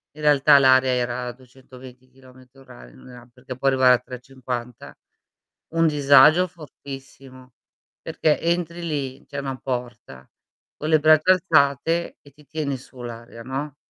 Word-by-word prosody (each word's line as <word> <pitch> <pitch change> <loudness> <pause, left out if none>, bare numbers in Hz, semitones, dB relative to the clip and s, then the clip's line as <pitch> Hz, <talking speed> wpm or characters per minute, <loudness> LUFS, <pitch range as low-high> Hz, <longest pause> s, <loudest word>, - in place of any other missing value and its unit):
in 155 - -12
realtà 145 -1 +5
l'aria 130 -1 +4
era 125 0 -2
a - - -4
220 130 0 -16
chilometri 130 0 -20
orari, 125 -2 -15
non - - -16
era 125 -1 -14
perché 130 0 -10
può 135 - -2
arrivare 130 -1 +4
a - - -1
350. 125 -1 -8 0.8
Un 165 0 +3
disagio 150 +4 +5
fortissimo, 135 -5 -13 0.5
perché 155 -2 -1
entri 170 0 -2
lì- 140 -4 -5
c'è 140 0 -8
una 135 -2 -4
porta- 120 - -7 0.5
con 155 - -5
le 155 0 +4
braccia 155 +3 +4
alzate 165 -2 +1
e 145 - -20
ti 150 +2 -21
tiene 150 -3 -4
su 130 0 -16
l'area, 115 0 -10
no? 135 +3 -5
135 Hz, 145 wpm, -22 LUFS, 125-150 Hz, 0.8 s, realtà